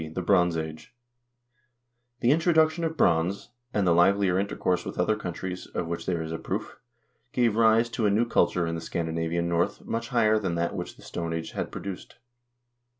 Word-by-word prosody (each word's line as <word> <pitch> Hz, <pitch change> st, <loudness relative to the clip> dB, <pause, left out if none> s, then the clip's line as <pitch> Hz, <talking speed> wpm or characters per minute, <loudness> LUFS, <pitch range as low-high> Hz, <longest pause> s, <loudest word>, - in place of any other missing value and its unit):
The 90 Hz, -, -2 dB
Bronze 90 Hz, -3 st, +3 dB
Age 80 Hz, +9 st, -6 dB, 1.3 s
The 120 Hz, -, +4 dB
introduction 160 Hz, +1 st, +3 dB
of 160 Hz, 0 st, -2 dB
bronze, 85 Hz, -, +1 dB, 0.2 s
and 105 Hz, -4 st, +1 dB
the 90 Hz, -, +4 dB
livelier 95 Hz, +1 st, +4 dB
intercourse 90 Hz, -2 st, -1 dB
with -, -, -7 dB
other 100 Hz, +5 st, +2 dB
countries, 90 Hz, -2 st, -5 dB
of -, -, -3 dB
which 85 Hz, 0 st, -5 dB
this 90 Hz, -, +1 dB
is 80 Hz, -1 st, -4 dB
a 80 Hz, -, -4 dB
proof, -, -, -5 dB, 0.5 s
gave 120 Hz, -4 st, +2 dB
rise 115 Hz, +1 st, +4 dB
to 115 Hz, -2 st, 0 dB
a -, -, +3 dB
new 105 Hz, +4 st, +2 dB
culture 90 Hz, -6 st, +2 dB
in 85 Hz, -, -2 dB
the 85 Hz, -, -4 dB
Scandinavian 85 Hz, +1 st, -2 dB
North 85 Hz, 0 st, -1 dB
much 115 Hz, 0 st, -3 dB
higher 110 Hz, -4 st, +3 dB
than 95 Hz, -5 st, -2 dB
that 85 Hz, 0 st, -1 dB
which -, -, -5 dB
the -, -, -17 dB
Stone 85 Hz, -1 st, -4 dB
Age 80 Hz, 0 st, -4 dB
had -, -, -4 dB
produced. 95 Hz, -2 st, -7 dB
90 Hz, 185 wpm, -27 LUFS, 85-110 Hz, 1.3 s, The